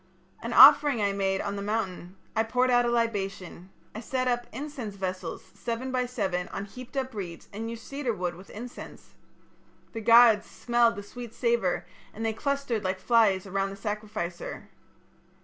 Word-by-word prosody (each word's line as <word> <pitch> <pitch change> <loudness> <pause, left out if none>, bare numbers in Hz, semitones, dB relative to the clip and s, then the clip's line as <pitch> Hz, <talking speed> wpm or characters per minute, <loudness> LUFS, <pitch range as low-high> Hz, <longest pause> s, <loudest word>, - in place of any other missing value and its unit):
"An - - -4
offering 285 -6 +8
I 200 -1 +2
made 195 -1 0
on 200 - -3
the - - -4
mountain. 195 -4 -3 0.2
I 220 - +3
poured 250 +3 +1
out 245 0 +4
a - - +1
libation. 195 -6 -2 0.2
I 220 - -6
set 255 +2 -2
up 240 -1 0
incense 270 -8 -6
vessels 185 -3 -4
seven 240 +2 -4
by 250 -1 0
seven 190 -7 -2
on 195 - -5
heaped 255 +6 -10
up 260 -1 -2
reeds 180 -5 -7
and 225 +2 -4
used 230 0 -8
cedar 275 -3 -2
wood 180 -5 -3
with 185 +3 -14
incense. 240 +3 -10 0.8
The 225 - -5
gods 230 -1 +6
smelt 240 -1 +2
the 205 - -7
sweet 235 +2 -9
savour, 235 -7 +1 0.3
and 225 +2 -4
they 220 - 0
clustered 275 -3 -2
like 185 0 -1
flies 205 -3 +3
about 195 0 -1
the 195 - -7
sacrificer. 205 -4 -5
220 Hz, 170 wpm, -27 LUFS, 195-240 Hz, 0.8 s, offering